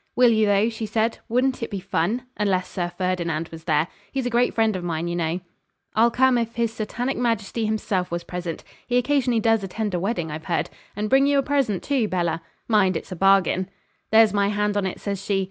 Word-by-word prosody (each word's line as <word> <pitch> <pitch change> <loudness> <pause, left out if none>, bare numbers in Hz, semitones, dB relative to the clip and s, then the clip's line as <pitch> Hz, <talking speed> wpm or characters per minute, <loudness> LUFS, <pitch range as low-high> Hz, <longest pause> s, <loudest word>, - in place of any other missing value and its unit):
'Will 245 -1 +6
you, 220 -1 +3
though?' 205 +2 +3
she 225 -1 -4
said. 225 +1 0
'Wouldn't 255 +3 +1
it 230 - -3
be 200 - -4
fun? 215 +5 -1
Unless 190 -3 0
Sir 175 -2 -2
Ferdinand 170 -3 -1
was 160 -1 -11
there. 155 0 +2 0.2
He's 265 -2 -2
a 245 - -1
great 240 +1 +3
friend 225 -2 +2
of 180 - -4
mine, 170 -1 -2
you 170 - -2
know.' 170 +1 -1 0.5
'I'll 230 +2 +5
come 255 +1 +3
if 230 0 -3
his 230 -1 0
Satanic 240 +4 -3
Majesty 230 -2 -1
himself 210 -4 -1
was 170 0 -3
present 175 -2 -5 0.2
(he 245 - +2
occasionally 250 -2 +2
does 225 -1 +2
attend 205 +2 -3
a 175 - 0
wedding, 175 -5 -2
I've 155 +1 -6
heard), 170 - -1 0.2
and 210 +1 -2
bring 270 +5 +4
you 285 0 +3
a 275 - +3
present, 270 -10 0
too, 265 -6 +1
Bella; 170 -4 -1 0.3
mind, 205 -4 +3
it's - - -9
a - - -3
bargain.' 190 0 +3 0.4
'There's 220 -1 +6
my 200 -1 +2
hand 210 0 0
on 200 -2 +1
it,' 185 - -5
says 200 -1 -4
she. 200 -2 0
210 Hz, 220 wpm, -24 LUFS, 180-235 Hz, 0.5 s, Will